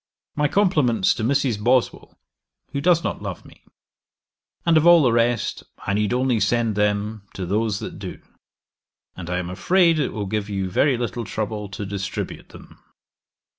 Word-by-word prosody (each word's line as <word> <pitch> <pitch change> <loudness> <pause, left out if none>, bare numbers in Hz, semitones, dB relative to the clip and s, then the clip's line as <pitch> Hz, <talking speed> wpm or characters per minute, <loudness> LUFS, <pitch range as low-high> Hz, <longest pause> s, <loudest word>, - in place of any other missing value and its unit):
'My 150 0 +2
compliments 145 - +2
to - - -5
Mrs. 125 -4 0
Boswell, 125 +1 0 0.5
who 140 - -2
does 170 +1 +3
not - - -3
love - - -6
me; - - -17 1.0
and 170 -1 +4
of 155 +1 +4
all 170 -2 +8
the 125 - +4
rest, 120 0 +1 0.2
I 100 - -3
need 105 0 0
only 125 -2 +1
send 115 +2 +1
them 105 +1 -1
to 95 - -4
those 105 +3 0
that - - -7
do: - - -7 1.0
and 90 -2 -8
I 90 - -1
am 90 0 -4
afraid 170 - +3
it 140 - 0
will 105 -3 -4
give 105 +1 -3
you 95 -2 -3
very 135 +6 +2
little 120 0 -3
trouble 105 -1 -4
to 100 +1 -6
distribute 95 -1 -5
them. - - -15
115 Hz, 170 wpm, -22 LUFS, 100-140 Hz, 1.0 s, all